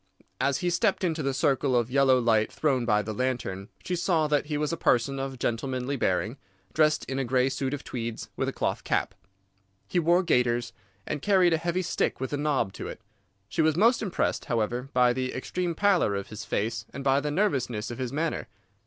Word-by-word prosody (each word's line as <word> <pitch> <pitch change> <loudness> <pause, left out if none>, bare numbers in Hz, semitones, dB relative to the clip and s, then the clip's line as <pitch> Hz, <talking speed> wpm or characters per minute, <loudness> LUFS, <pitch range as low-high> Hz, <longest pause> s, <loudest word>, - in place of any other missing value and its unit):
As 140 -1 +2
he 175 - +2
stepped 200 +1 +1
into 165 -3 0
the 135 -1 0
circle 135 -1 +1
of 120 0 +1
yellow 135 -1 +5
light 115 -3 +2
thrown 135 -6 0
by 105 -2 +2
the 110 +1 -4
lantern 115 -5 -2 0.2
she 180 - -1
saw 170 -2 +1
that 150 -1 +1
he 150 -1 -1
was 150 +2 -1
a - - +1
person 135 -2 +1
of 135 -1 -4
gentlemanly 125 +3 -2
bearing, 110 +1 0 0.4
dressed 155 0 +3
in 135 0 -3
a - - +1
grey 130 +1 +2
suit 135 0 -2
of 145 - -4
tweeds, 115 -2 -5
with - - -1
a - - -3
cloth - - -2
cap. - - 0 0.7
He 180 - +1
wore 175 +2 +3
gaiters, 120 -6 +1 0.3
and 145 - -3
carried 185 -4 +4
a - - +3
heavy 170 +3 -1
stick - - -1
with 130 +2 -4
a - - +1
knob 145 -9 0
to - - -6
it. - - -7 0.5
She 160 - 0
was 155 -1 +3
most 230 +6 +4
impressed, 200 -5 -1
however, 120 +1 -1
by 125 -2 +4
the 130 0 -3
extreme 175 +6 -2
pallor 185 - +3
of 100 0 -4
his 110 0 -7
face 110 +3 -1
and 140 - -6
by 135 0 +3
the 150 +1 -2
nervousness 135 - 0
of 120 - -7
his 130 -2 -2
manner. 160 +3 -2
135 Hz, 210 wpm, -27 LUFS, 120-160 Hz, 0.7 s, yellow